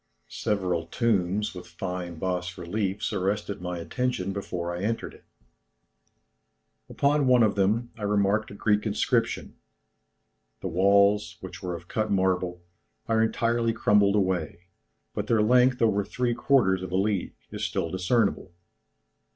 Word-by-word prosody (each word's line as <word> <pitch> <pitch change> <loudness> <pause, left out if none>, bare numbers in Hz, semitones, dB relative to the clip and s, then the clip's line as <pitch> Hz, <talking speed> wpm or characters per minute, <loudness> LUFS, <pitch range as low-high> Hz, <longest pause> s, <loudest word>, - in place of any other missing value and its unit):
Several 90 -5 -1
tombs, 105 -1 0
with 90 -1 -9
fine 85 0 -5
bas 90 +1 -3
reliefs 100 +4 -2
arrested 100 0 -2
my 90 0 -4
attention 100 +1 -2
before 85 -3 -4
I 90 - -5
entered 115 +3 -2
it; - - -18 1.6
upon 140 -1 +2
one 125 -2 +5
of 105 - +3
them, 110 +5 +1
I 110 - -14
remarked 105 +1 +1
a 100 - -10
Greek 105 +1 +1
inscription. 105 - -1 1.0
The 95 - -3
walls, 100 0 +3
which 95 - -9
were 90 -2 -3
of 85 +1 -10
cut 110 +2 -1
marble, 95 -2 0 0.4
are 110 -1 +2
entirely 115 +1 +1
crumbled 105 -3 +3
away, 95 -4 -1 0.5
but - - -3
their 110 -2 +3
length 125 +2 +4
over 100 -3 +3
three 120 +4 -1
quarters 120 -7 +2
of 95 -1 -6
a 95 - +1
league, 100 -1 -1 0.2
is - - -5
still 85 - -2
discernible. 95 0 0
100 Hz, 140 wpm, -26 LUFS, 90-110 Hz, 1.6 s, one